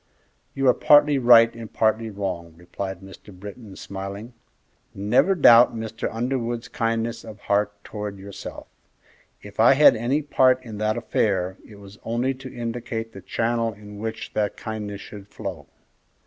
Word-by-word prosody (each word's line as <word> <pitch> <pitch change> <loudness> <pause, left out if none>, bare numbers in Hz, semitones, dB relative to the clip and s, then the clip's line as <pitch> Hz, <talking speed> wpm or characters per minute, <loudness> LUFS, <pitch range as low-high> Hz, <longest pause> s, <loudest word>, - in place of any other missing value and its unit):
"You 135 -1 +1
are 125 - +7
partly 145 -1 +5
right 115 -2 +6
and 115 -2 -9
partly 110 0 +1
wrong," 90 -5 -5
replied 95 +2 -6
Mr. 95 +2 -13
Britton, 100 +2 -11
smiling. 100 +5 -7 0.6
"Never 120 - +2
doubt 120 -7 +7
Mr. 110 0 -4
Underwood's 120 0 -2
kindness 115 0 -2
of 110 -2 -10
heart 105 0 +1
towards 105 -2 -6
yourself. 100 +1 -9 0.8
If 105 +1 -13
I 120 +4 +7
had 140 -3 +7
any 125 +7 0
part 130 -3 +3
in 110 -4 -8
that 110 +1 0
affair, 95 -5 0
it 105 - -14
was 100 +1 -14
only 120 +4 -1
to 130 0 -10
indicate 115 -1 -5
the 95 - -10
channel 115 +3 -1
in 105 0 -12
which 110 +1 -5
that 105 -1 -1
kindness 105 -2 -6
should 100 -2 -11
flow." - - -7
110 Hz, 150 wpm, -24 LUFS, 100-120 Hz, 0.8 s, are